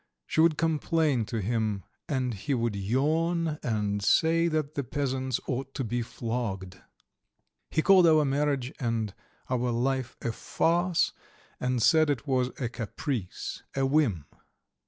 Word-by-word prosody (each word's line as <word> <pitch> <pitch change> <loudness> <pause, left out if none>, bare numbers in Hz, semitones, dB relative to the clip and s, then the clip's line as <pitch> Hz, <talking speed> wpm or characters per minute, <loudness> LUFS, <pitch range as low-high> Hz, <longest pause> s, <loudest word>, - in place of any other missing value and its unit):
She 160 - +1
would 160 -2 +4
complain 155 -5 +1
to 110 +1 -3
him, 110 -2 -1 0.3
and 130 -4 0
he 135 +8 -2
would 115 -3 -1
yawn 155 - 0
and 105 -3 -1
say 165 +10 +3
that 155 -2 -1
the 140 - -2
peasants 130 -1 -1
ought 135 +1 -4
to 135 - -1
be 120 +1 -1
flogged. 110 -6 -4 0.9
He 155 - +1
called 190 -3 +7
our 155 -2 +5
marriage 140 -1 0
and 115 -5 -1 0.3
our 125 -1 0
life 125 +1 -1
a 120 - 0
farce, 170 +8 +1 0.5
and 125 -2 0
said 160 +1 +5
it 145 -1 -1
was 130 -3 +1
a 125 - -1
caprice, 115 - -4
a 135 0 +2
whim. 135 - +2
130 Hz, 140 wpm, -28 LUFS, 115-155 Hz, 0.9 s, called